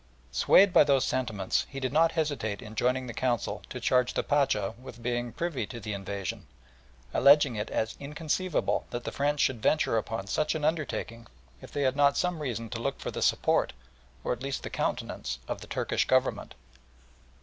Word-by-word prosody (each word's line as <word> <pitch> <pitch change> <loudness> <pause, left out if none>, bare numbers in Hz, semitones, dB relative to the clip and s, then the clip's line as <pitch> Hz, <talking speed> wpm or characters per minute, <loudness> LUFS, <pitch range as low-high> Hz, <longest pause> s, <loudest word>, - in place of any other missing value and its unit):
Swayed 180 - +5
by - - +8
these 140 -2 +3
sentiments, 110 -7 -1
he 135 - -6
did 130 0 -2
not 165 +2 +4
hesitate 145 -10 -2
on 110 - -9
joining 125 +3 +1
the 120 - -6
Council 120 -2 -1
to - - -5
charge 125 -1 +2
the - - +1
Pacha 120 -9 +1
with 120 -2 -11
being 120 0 -1
privy 170 -2 -3
to 120 - -7
the 105 -1 -4
invasion, 100 -1 -5 0.7
alleging 140 -3 +6
it 105 +1 -3
as 110 - -2
inconceivable 155 +5 -1
that 120 0 -5
the - - -4
French 145 +1 0
should 120 -4 +1
venture 115 -4 +2
upon 110 -2 -4
such 150 +11 0
an 150 -1 -1
undertaking 135 -7 -2 0.3
if - - -11
they 145 - -1
had 130 0 +2
not 140 0 +4
some 180 -3 0
reason 115 -5 -3
to 115 - -4
look 140 +3 -2
for - - -4
the - - -5
support, - - +2 0.5
or - - 0
at 125 - -8
least 135 0 -3
the - - -6
countenance 65 -1 -2
of - - -4
the - - -10
Turkish - - 0
Government. 130 0 +1
130 Hz, 190 wpm, -29 LUFS, 115-145 Hz, 0.7 s, by